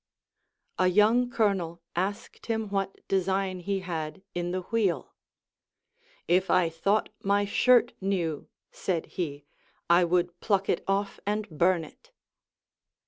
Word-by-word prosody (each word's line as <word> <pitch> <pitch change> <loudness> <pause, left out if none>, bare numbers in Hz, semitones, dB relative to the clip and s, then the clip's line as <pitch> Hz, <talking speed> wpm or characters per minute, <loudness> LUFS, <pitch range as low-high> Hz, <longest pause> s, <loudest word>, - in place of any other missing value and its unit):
A 185 - +4
young 215 +6 +4
colonel 195 -8 0 0.2
asked 195 +4 -3
him 220 -2 -1
what 195 -1 -3
design 190 0 0
he 195 +2 -2
had 160 -2 -5
in 175 0 -2
the 185 +1 -2
wheel. 190 - -1 1.1
If 185 +3 +2
I 180 -2 +4
thought 195 +6 +1
my 200 +1 +2
shirt 245 +4 +4
knew, 175 -6 -2 0.2
said 175 -4 -2
he, 145 -5 -5 0.5
I 175 +1 +6
would 175 0 0
pluck 195 -2 0
it - - +1
off 195 +1 -1
and 210 0 -1
burn 175 +1 +3
it. 155 - -15
190 Hz, 130 wpm, -28 LUFS, 175-200 Hz, 1.1 s, I